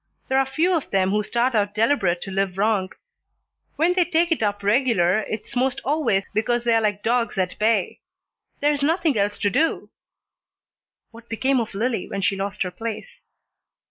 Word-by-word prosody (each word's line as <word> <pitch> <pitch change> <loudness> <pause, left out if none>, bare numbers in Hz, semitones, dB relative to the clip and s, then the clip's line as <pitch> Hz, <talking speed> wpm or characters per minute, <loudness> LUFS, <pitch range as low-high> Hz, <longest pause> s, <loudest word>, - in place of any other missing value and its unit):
There 265 0 +3
're 270 - +2
few 325 +7 +1
of 320 - -3
them 190 -1 +1
who 210 +1 +1
start 240 +4 0
out 205 -2 0
deliberate 210 -7 +1
to 195 - -7
live 190 -1 -1
wrong. 200 -2 +1 0.9
When 335 +4 +2
they 360 -1 +3
take 340 0 +1
it 330 - +1
up 205 -1 -1
regular 205 -4 +2
it's 215 +2 -6
'most 260 +1 0
always 265 -10 +1
because 235 +2 0
they're 230 -1 +3
like 205 -2 -1
dogs 235 -1 0
at 180 -1 -2
bay. 215 -3 +1 0.6
There's 290 0 +1
nothing 315 -1 +1
else 205 0 0
to 205 - 0
do." 325 - 0 1.2
"What 230 0 -15
became 260 +4 +1
of 220 -4 -4
Lillie 225 -1 -2
when 195 -1 -4
she 195 - +2
lost 200 +1 -3
her 180 - -5
place?" 230 - -7
225 Hz, 175 wpm, -23 LUFS, 200-265 Hz, 1.2 s, There